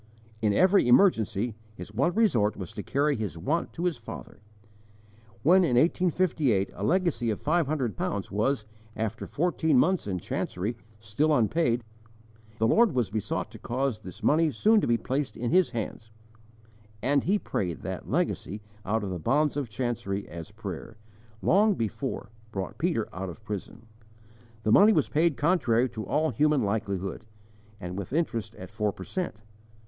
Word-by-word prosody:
In 105 Hz, -2 st, +3 dB
every 185 Hz, -, +4 dB
emergency, 120 Hz, -, +4 dB, 0.2 s
his 90 Hz, +3 st, -9 dB
one 140 Hz, -, +1 dB
resort 120 Hz, -, +2 dB
was 95 Hz, -4 st, -7 dB
to 105 Hz, -, -5 dB
carry 145 Hz, +6 st, +1 dB
his 105 Hz, -8 st, -4 dB
want 150 Hz, -, -1 dB
to 170 Hz, -, -5 dB
his 175 Hz, -6 st, 0 dB
Father. 115 Hz, -, -9 dB, 1.0 s
When, 185 Hz, +5 st, +6 dB
in 130 Hz, -8 st, +2 dB
1858, 155 Hz, -, +2 dB
a 100 Hz, -, -6 dB
legacy 170 Hz, -, +1 dB
of 105 Hz, -, -1 dB
five 160 Hz, 0 st, +1 dB
hundred 130 Hz, -, -1 dB
pounds 100 Hz, -1 st, -3 dB
was, 110 Hz, +3 st, 0 dB, 0.3 s
after 110 Hz, 0 st, -3 dB
fourteen 160 Hz, -3 st, +1 dB
months 180 Hz, -, +2 dB
in 95 Hz, -2 st, -1 dB
chancery, 95 Hz, +5 st, -3 dB, 0.2 s
still 110 Hz, +9 st, 0 dB
unpaid, 125 Hz, -1 st, +2 dB, 0.7 s
the 110 Hz, -, +2 dB
Lord 225 Hz, -, +4 dB
was 120 Hz, -7 st, 0 dB
besought 110 Hz, -1 st, -2 dB
to -, -, -11 dB
cause 130 Hz, -2 st, -1 dB
this 95 Hz, -5 st, -11 dB
money 160 Hz, +1 st, +4 dB
soon 210 Hz, -, +3 dB
to -, -, 0 dB
be 120 Hz, 0 st, +3 dB
placed 135 Hz, +4 st, -2 dB
in 120 Hz, 0 st, -2 dB
his 185 Hz, 0 st, +4 dB
hands; 110 Hz, -2 st, -5 dB, 0.9 s
and 140 Hz, +2 st, +2 dB
he 200 Hz, +4 st, +3 dB
prayed 90 Hz, -, -3 dB
that -, -, -5 dB
legacy 105 Hz, -, -1 dB, 0.2 s
out 110 Hz, +2 st, 0 dB
of 95 Hz, -, -3 dB
the 90 Hz, -, -3 dB
bonds 145 Hz, -, +2 dB
of 140 Hz, -5 st, -2 dB
chancery 105 Hz, -4 st, -3 dB
as 85 Hz, +3 st, -8 dB
prayer, 105 Hz, 0 st, -7 dB, 0.5 s
long 205 Hz, +1 st, +4 dB
before, 115 Hz, -, -3 dB, 0.2 s
brought 95 Hz, +1 st, -5 dB
Peter 160 Hz, -8 st, 0 dB
out 95 Hz, +1 st, -4 dB
of 100 Hz, +6 st, -11 dB
prison. 105 Hz, +2 st, -6 dB, 0.8 s
The 110 Hz, -, +1 dB
money 210 Hz, -, +7 dB
was 155 Hz, -, +2 dB
paid 160 Hz, 0 st, +2 dB
contrary 130 Hz, -7 st, +2 dB
to 110 Hz, -2 st, -6 dB
all 155 Hz, +1 st, +1 dB
human 150 Hz, +2 st, +2 dB
likelihood, 100 Hz, -1 st, -2 dB, 0.6 s
and 90 Hz, -1 st, -6 dB
with 100 Hz, +2 st, -5 dB
interest 115 Hz, -9 st, -1 dB
at 95 Hz, 0 st, -10 dB
four 105 Hz, 0 st, 0 dB
per 95 Hz, -, -9 dB
cent. 180 Hz, -, -3 dB
120 Hz, 165 wpm, -28 LUFS, 105-155 Hz, 1.0 s, money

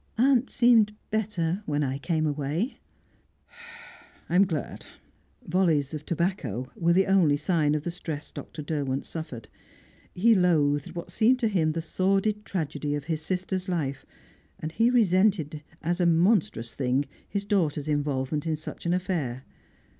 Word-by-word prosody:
"Aunt 260 Hz, +1 st, +3 dB
seemed 225 Hz, -4 st, +4 dB, 0.2 s
better 200 Hz, -4 st, -1 dB
when 145 Hz, -1 st, 0 dB
I 135 Hz, 0 st, -2 dB
came 155 Hz, +1 st, 0 dB
away." 150 Hz, -, -2 dB, 1.5 s
"I'm 185 Hz, +3 st, +4 dB
glad." 155 Hz, -7 st, -4 dB, 0.6 s
Volleys 160 Hz, -6 st, +1 dB
of 150 Hz, -1 st, -6 dB
tobacco 145 Hz, -, -2 dB
were 170 Hz, -5 st, +2 dB
the 190 Hz, +2 st, +4 dB
only 175 Hz, -7 st, +4 dB
sign 150 Hz, -2 st, +1 dB
of 150 Hz, -, -2 dB
the 175 Hz, -, -3 dB
stress 160 Hz, -4 st, -6 dB
Dr. 150 Hz, -, -8 dB
Derwent 140 Hz, -3 st, -2 dB
suffered. 125 Hz, -9 st, -7 dB, 0.7 s
He 225 Hz, +6 st, +5 dB
loathed 160 Hz, -4 st, +2 dB
what 170 Hz, +1 st, -6 dB
seemed 230 Hz, +7 st, +4 dB
to 230 Hz, -, +3 dB
him 165 Hz, -7 st, +1 dB
the 165 Hz, 0 st, -3 dB
sordid 195 Hz, +5 st, 0 dB
tragedy 150 Hz, -4 st, -2 dB
of 145 Hz, -, -4 dB
his 155 Hz, +1 st, -3 dB
sister's 185 Hz, +2 st, -3 dB
life, 140 Hz, -6 st, -2 dB, 0.5 s
and 155 Hz, -, -5 dB
he 230 Hz, +7 st, +3 dB
resented 185 Hz, -, +2 dB, 0.2 s
as 175 Hz, +3 st, 0 dB
a 175 Hz, -, +3 dB
monstrous 165 Hz, -, +2 dB
thing 130 Hz, +1 st, 0 dB, 0.2 s
his 200 Hz, -1 st, -2 dB
daughter's 160 Hz, -8 st, 0 dB
involvement 145 Hz, 0 st, -1 dB
in 160 Hz, -, +1 dB
such 155 Hz, +2 st, -7 dB
an 175 Hz, -, +2 dB
affair. 155 Hz, -9 st, -2 dB
165 Hz, 145 wpm, -27 LUFS, 145-190 Hz, 1.5 s, He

